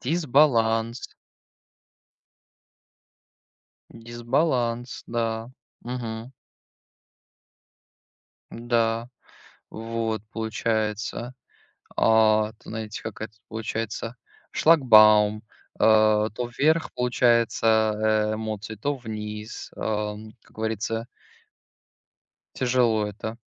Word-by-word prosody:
Дисбаланс. 125 -6 +2 2.8
Дисбаланс, 120 +1 -2
да. 115 0 -2 0.3
Мгм. 120 0 -6 2.2
М-да. 115 0 0 0.6
Вот 115 -1 -3
получается. 110 +1 -2 0.6
А, 110 -1 +4
т 110 - -15
знаете, 110 -1 -6
как 110 -2 -7
это 110 0 -6
получается 110 +1 -4 0.4
шлагбаум, 110 -8 +5 0.4
а, 110 0 +4
то 120 +3 -4
вверх 160 +3 +2
получается, 110 -3 +2
э, - - -1
эмоции, 110 0 -5
то 140 +7 -2
вниз, 105 -2 -7
ам, 105 0 -3
как - - -25
говорится. 110 +1 -3 1.5
Тяжело 120 -4 +2
это. 110 +2 -6
110 Hz, 70 wpm, -25 LUFS, 110-120 Hz, 2.8 s, шлагбаум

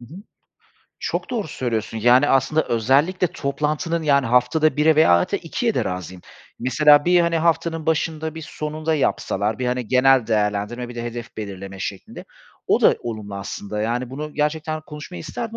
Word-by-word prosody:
Hı - - -12
hı. - - -9 0.8
Çok - - -3
doğru 220 -9 -2
söylüyorsun, 115 -4 -3
yani, 125 +5 +5
aslında 135 +4 +2
özellikle 140 - +2
toplantının, 155 +3 -2
yani, 140 -3 +3
haftada 125 +6 +2
1'e 155 +1 +4
veya 90 - +6
hadi 85 - -1
2'ye - - -2
de - - 0
razıyım. 90 0 -6 0.4
Mesela 145 +4 +4
bir, 175 0 +4
hani, 170 -1 +1
haftanın 165 -1 0
başında, 160 0 -1
bir 160 - -7
sonunda 155 +1 -3
yapsalar, 105 -7 -1
bir, 130 - -2
hani, 125 -2 -2
genel 130 -2 +4
değerlendirme, 105 +2 -1
bir 120 - -9
de 120 - -5
hedef 120 0 -7
belirleme 100 -2 -7
şeklinde, 95 0 -7 0.4
o - - +3
da - - +5
olumlu 110 -4 -6
aslında. 100 +1 -5
Yani, 120 +3 -2
bunu 150 +3 -6
gerçekten 155 +1 -1
konuşmayı 155 +3 -9
isterdim 225 +9 -6
135 Hz, 165 wpm, -22 LUFS, 115-155 Hz, 0.8 s, veya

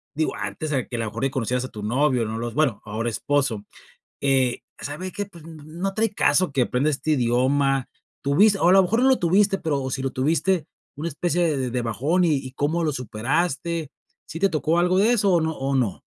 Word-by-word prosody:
Digo, 155 -4 -1
antes, 105 +10 -4
eh, 130 -6 -1
que, 120 - -4
a - - -3
lo 115 - -1
mejor, 115 +4 -5
que 135 - +1
conocieras 125 0 -1
a - - -7
tu 105 -3 -8
novio. 125 +1 +1
No 110 +1 -4
los 120 0 -4
bueno, 140 -8 +1
ahora 110 +3 -2
esposo. 130 -3 -1 0.6
Eh, 130 -3 +1 0.2
"¿sabe 175 +6 -5
qué? 205 - -4
Pues, 170 -5 -15
n 160 -2 -11
no 175 +5 -3
trae 220 -1 0
caso, 175 +2 +3
que 135 -2 +2
aprenda 125 +5 0
este 155 +2 -2
idioma". 135 +1 +1 0.3
¿Tuviste? 195 +9 +4
O 175 - +4
a - - +6
lo 195 - +7
mejor 225 +7 +1
no 265 - +5
lo 260 - +4
tuviste, 195 +3 +3
pero 140 -4 -2
si 130 - -3
lo 135 -1 -2
tuviste, 165 +5 +1 0.3
¿una 160 +3 -3
especie 170 0 0
de 130 -2 -2
de 125 0 -1
bajón? 140 - +1
Y 155 -4 +3
y, 130 -1 -6
¿cómo 155 +5 -1
lo 150 - 0
superaste? 145 +6 -2 0.4
¿Sí 165 -1 -7
te 195 - +4
tocó 160 +1 0
algo 180 +1 +2
de 220 +5 +4
eso, 205 -4 +2
o 170 - +4
no 160 0 0
o 135 +1 -1
no? 120 -7 -1
145 Hz, 225 wpm, -23 LUFS, 125-170 Hz, 0.6 s, lo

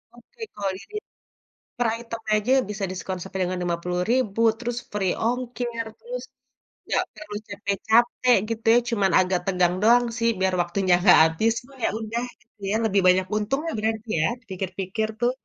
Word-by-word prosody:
oke, 460 - -19
kalau 200 -1 -2
di - - -12
di - - -10 0.8
per 245 - +2
item 230 -1 -7
aja 215 +4 +1 0.2
bisa 205 -1 -3
diskon 185 0 -4
sampai 190 +1 -6
dengan 180 0 -1
Rp50.000, 180 +7 0 0.2
terus 240 0 -3 0.2
free 195 -3 0
ongkir, 240 -1 -2
terus - - -6 0.7
nggak - - +1
perlu 210 0 -9
capek-capek, 220 +5 +2
gitu 225 0 -4
ya. 240 - +6
Cuman 205 -5 +2
agak 185 0 +2
tegang 180 -2 +2
doang 240 +2 +6
sih, 230 -1 +2
biar 190 -1 +1
waktunya 180 +1 +1
nggak 185 - +8
habis, 160 +8 +2
cuman 270 +2 -18
ya - - +3
udah, 225 +2 -3 0.2
gitu 225 -2 -32
ya, - - +1
lebih 200 -2 +2
banyak 185 +1 +4
untungnya, 270 +10 -1
berarti 220 +1 -2
ya, 155 - +3
dipikir-pikir 190 0 -4
tuh. 240 +1 +3
215 Hz, 165 wpm, -24 LUFS, 190-235 Hz, 0.8 s, nggak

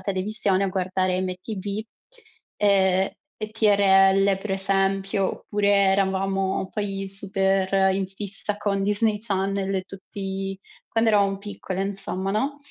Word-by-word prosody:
televisione 195 0 0
a - - 0
guardare 185 0 0
MTV, 195 +3 -4 0.7
ehm, 190 -2 +3 0.3
e 215 0 -5
TRL 195 -2 +4
per 195 +2 -6
esempio. 195 0 +1
Oppure 205 -1 -2
eravamo 195 -1 +1
poi 195 -2 -3
super 195 0 +1
in 195 -1 -1
fissa 200 +1 -5
con 200 -2 -1
Disney 210 +1 +1
Channel 195 -2 -1
e 185 - -1
tutti 195 0 -6 0.3
quando 225 0 +2
eravamo 200 -2 +2
piccole 195 -2 -5
insomma, 195 -1 -3
no. 275 +7 -1
195 Hz, 120 wpm, -24 LUFS, 190-205 Hz, 0.7 s, TRL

